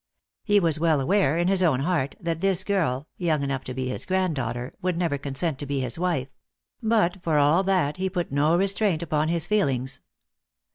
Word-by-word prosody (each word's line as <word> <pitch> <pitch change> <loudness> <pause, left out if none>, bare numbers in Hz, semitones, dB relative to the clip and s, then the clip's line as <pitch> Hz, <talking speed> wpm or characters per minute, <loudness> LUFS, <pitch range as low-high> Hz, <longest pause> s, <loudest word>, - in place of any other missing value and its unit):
He 205 -1 +4
was 165 -4 +1
well 160 -3 +2
aware, 160 0 +2
in 175 +1 +1
his 190 0 +3
own 150 -8 +2
heart, 150 -4 -1
that 165 -1 -3
this 195 -1 +2
girl, 155 -9 -1
young 160 -5 0
enough 135 -1 -2
to 130 - -5
be 130 0 -2
his 125 - -4
granddaughter, 135 -10 -1
would 180 -2 -1
never 165 -5 -1
consent 140 +2 -3
to 145 - -5
be 140 -1 -1
his 125 +4 -2
wife; 170 -7 -1 0.5
but 215 -5 +1
for 160 -3 +1
all 150 +5 +4
that, 180 -6 +1
he 190 0 -1
put 175 -5 -3
no 150 +4 +2
restraint 195 -3 +1
upon 155 -1 0
his 165 -1 0
feelings. 135 -11 0
165 Hz, 195 wpm, -25 LUFS, 140-185 Hz, 0.5 s, He